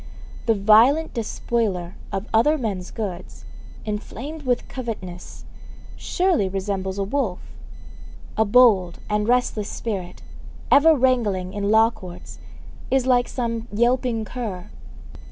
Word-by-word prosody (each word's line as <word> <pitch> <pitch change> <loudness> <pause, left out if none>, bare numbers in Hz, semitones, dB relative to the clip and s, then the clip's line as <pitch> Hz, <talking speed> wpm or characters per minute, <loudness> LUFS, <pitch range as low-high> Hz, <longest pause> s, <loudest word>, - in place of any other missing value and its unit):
The 225 - +4
violent 225 +10 +4
despoiler 210 -5 -2 0.2
of 195 +2 -3
other 295 +8 +4
men's 200 -8 -3
goods, 195 -6 -6 0.4
enflamed 235 +8 -5
with 245 -1 0
covetousness, 200 -8 -7 0.5
surely 355 - +1
resembles 190 0 -3
a 200 - 0
wolf. 205 -3 -1 1.0
A 220 - +3
bold 205 -6 +4
and 210 0 +1
restless 240 -4 +1
spirit, 195 -6 -5 0.5
ever 315 +3 +7
wrangling 225 -9 +1
in 205 -1 -2
law 220 +1 +5
courts, 185 -6 -11 0.5
is 260 -1 +2
like 245 -2 +3
some 230 -2 -3
yelping 235 0 +1
cur. 210 -7 -6
220 Hz, 115 wpm, -23 LUFS, 195-250 Hz, 1.0 s, ever